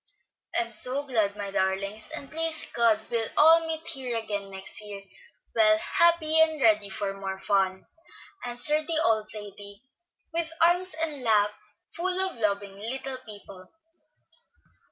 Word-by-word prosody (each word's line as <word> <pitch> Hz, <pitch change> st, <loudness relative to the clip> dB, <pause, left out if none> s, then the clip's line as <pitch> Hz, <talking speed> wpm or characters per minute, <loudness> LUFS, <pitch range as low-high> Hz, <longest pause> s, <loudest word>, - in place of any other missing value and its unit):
"I'm 230 Hz, -1 st, -1 dB
so 255 Hz, +6 st, +5 dB
glad, 220 Hz, -7 st, 0 dB
my 200 Hz, -1 st, -5 dB
darlings, 195 Hz, +3 st, -2 dB
and 275 Hz, -, -8 dB
please 325 Hz, 0 st, -1 dB
God 225 Hz, -2 st, +2 dB
we'll 230 Hz, -2 st, 0 dB
all 325 Hz, +2 st, +6 dB
meet 320 Hz, 0 st, -4 dB
here 260 Hz, -6 st, -3 dB
again 205 Hz, -3 st, -4 dB
next 190 Hz, +2 st, -3 dB
year, 200 Hz, -1 st, -9 dB, 0.5 s
well 215 Hz, -1 st, +5 dB
and 215 Hz, -, +1 dB
happy 330 Hz, 0 st, +3 dB
and 315 Hz, -1 st, +3 dB
ready 215 Hz, -5 st, +3 dB
for 195 Hz, +1 st, -3 dB
more 195 Hz, -1 st, -5 dB
fun," 190 Hz, -1 st, 0 dB, 0.6 s
answered 275 Hz, +6 st, +1 dB
the 325 Hz, -2 st, +1 dB
old 220 Hz, -1 st, +1 dB
lady, 205 Hz, 0 st, -9 dB, 0.5 s
with 335 Hz, -1 st, -2 dB
arms 350 Hz, +1 st, +3 dB
and 315 Hz, -4 st, -2 dB
lap 210 Hz, -3 st, +3 dB, 0.4 s
full 365 Hz, +2 st, -2 dB
of 380 Hz, -7 st, -1 dB
loving 200 Hz, -2 st, -2 dB
little 260 Hz, +4 st, -4 dB
people. 200 Hz, -3 st, -11 dB
225 Hz, 145 wpm, -27 LUFS, 200-310 Hz, 0.6 s, all